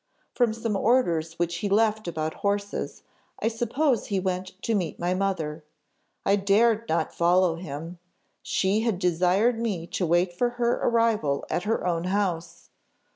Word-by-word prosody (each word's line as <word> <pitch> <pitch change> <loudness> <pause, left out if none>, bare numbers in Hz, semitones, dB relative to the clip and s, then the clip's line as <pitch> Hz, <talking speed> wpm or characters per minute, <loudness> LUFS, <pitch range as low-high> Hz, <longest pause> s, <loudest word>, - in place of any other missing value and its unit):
"From 240 -3 +2
some 225 -1 -2
orders 175 -8 +2
which 170 0 -1
he 200 +4 -2
left 215 0 +2
about 160 -2 -2
horses, 200 0 -2 0.4
I - - 0
suppose 240 +3 0
he 200 -2 0
went 185 0 -3
to 230 - 0
meet 185 -6 -1
my 175 +1 0
mother. 165 -5 -2 0.6
I 200 +1 +4
dared 220 +3 +2
not 165 - 0
follow 175 0 +3
him. 165 +1 -7 0.4
She 195 +3 +1
had 225 -4 0
desired 185 +6 +2
me 200 -8 -2
to 175 +1 -2
wait 175 +2 +2
for 240 +7 +1
her 240 0 +2
arrival 225 -12 +1
at 175 - -1
her 220 -3 0
own 170 -1 0
house. 175 -3 -2
190 Hz, 155 wpm, -26 LUFS, 170-220 Hz, 0.6 s, I